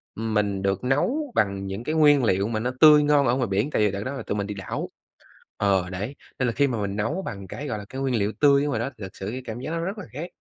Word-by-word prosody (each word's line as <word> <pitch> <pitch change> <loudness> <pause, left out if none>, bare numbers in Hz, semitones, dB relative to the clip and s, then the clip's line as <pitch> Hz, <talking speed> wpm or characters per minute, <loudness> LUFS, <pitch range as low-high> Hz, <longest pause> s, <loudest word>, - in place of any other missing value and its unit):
mình 105 -3 -1
được 95 0 -1
nấu 245 - 0
bằng 100 -2 +1
những 95 +4 -5
cái 155 +5 -2
nguyên 145 -3 +5
liệu 100 -2 +2
mà 110 -1 -2
nó 125 +3 -1
tươi 150 -1 +8
ngon 145 -2 +4
ở 120 - +3
ngoài 130 -2 0
biển 100 +7 0
tại - - +1
vì 105 - +2
đợt 100 +1 -4
đó 130 - -4
là 135 -4 -5
tụi 105 - -3
mình 100 -1 -2
đi 105 - -4
đảo 95 -2 -5 0.7
ờ, 95 -3 +1
đấy, 100 +9 -4 0.2
nên 125 - +1
là - - 0
khi 140 +4 +2
mà 120 -5 -2
mình 100 -1 -2
nấu 145 - -1
bằng 100 - -6
cái, 145 - -6
gọi 110 - -2
là, 105 - -7
cái 130 - -6
nguyên 135 -2 0
liệu 105 -2 +1
tươi 140 -1 +5
ở - - -1
ngoài 120 -6 -1
đó 120 - -2
thì - - -10
thực 95 - -10
sự 95 - -5
cái 130 +3 -5
cảm 115 0 -6
giác 130 - -5
nó 165 - -2
rất 190 +6 -3
là 210 - -6
khác. 160 +7 -6
115 Hz, 305 wpm, -25 LUFS, 100-145 Hz, 0.7 s, tươi